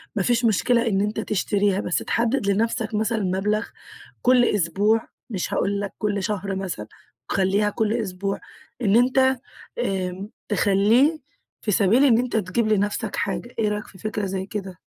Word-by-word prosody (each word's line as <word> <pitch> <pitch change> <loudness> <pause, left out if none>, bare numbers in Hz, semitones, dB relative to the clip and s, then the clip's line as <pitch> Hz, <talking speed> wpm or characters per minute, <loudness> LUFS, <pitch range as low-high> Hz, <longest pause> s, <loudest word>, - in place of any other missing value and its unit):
ما 200 - +1
فيش 240 +2 +2
مشكلة 235 +2 +2
إن 195 -2 +1
أنت 210 +1 -1
تشتريها، 200 -1 0
بس 180 - -1
تحدد 235 -1 0
لنفسك 220 +2 0
مثلًا 220 +1 0
مبلغ 200 +4 0 0.6
كل 250 -1 +5
أسبوع، 205 +4 +1 0.2
مش 190 -5 -3
هاقول 200 +1 0
لك 200 - -4
كل 205 -2 -1
شهر 195 -1 -2
مثلًا، 180 - -4 0.4
خلّيها 195 +2 +2
كل 215 +1 0
أسبوع 195 -3 -2 0.4
إن 205 -2 +3
أنت 260 +2 +4 0.4
آمم 190 - -2 0.2
تخلّيه 215 - +3 0.4
في 210 - -1
سبيل 215 +8 +4
إن 230 -4 +5
أنت 245 -2 -1
تجيب 215 +3 0
لنفسك 210 +1 0
حاجة، 230 +4 -3
إيه 215 -2 +2
رأيك 210 0 -3
في 190 - -15
فكرة 210 +1 -3
زي 190 0 -3
كده؟ 195 -3 -6
210 Hz, 155 wpm, -23 LUFS, 195-230 Hz, 0.6 s, كل